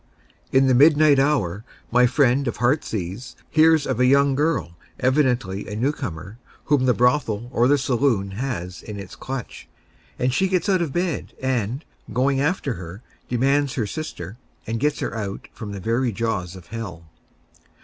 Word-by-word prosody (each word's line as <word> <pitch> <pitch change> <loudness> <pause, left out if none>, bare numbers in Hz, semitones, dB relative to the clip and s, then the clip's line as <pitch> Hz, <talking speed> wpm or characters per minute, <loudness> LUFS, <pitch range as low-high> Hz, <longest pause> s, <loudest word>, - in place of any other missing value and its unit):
In 135 +1 +4
the 130 - +4
midnight 145 +1 +6
hour 115 - +1 0.3
my 125 +1 +5
friend 135 +1 +2
of 120 - -2
Heartsease 120 - -1 0.2
hears 160 -1 +5
of - - -2
a 125 - +4
young 140 +1 +4
girl, 145 - 0 0.2
evidently 125 -8 +1
a 105 - -5
new 125 +7 +1
comer, 105 - -7 0.3
whom 145 -3 +2
the 125 - +4
brothel 120 -3 +1
or 120 0 +3
the 145 +2 +4
saloon 125 -7 +1
has 95 -5 -4
in 105 -2 -7
its 100 - -9
clutch, 130 -3 -7 0.5
and 125 0 0
she 190 +8 +2
gets 185 +1 0
out 190 -3 +3
of 165 -5 -1
bed, 175 0 -2
and, 130 +1 -2 0.3
going 135 +4 +1
after 150 -3 0
her, 90 +3 -9 0.3
demands 135 +2 +1
her 115 - 0
sister, 115 -4 -6 0.3
and 115 +1 -3
gets 150 +2 0
her - - -2
out 100 -3 -5
from 110 -3 -7
the 100 - -6
very 115 +5 0
jaws 95 -5 -2
of 90 -2 -12
hell. 100 -8 -7
125 Hz, 170 wpm, -23 LUFS, 105-140 Hz, 0.5 s, midnight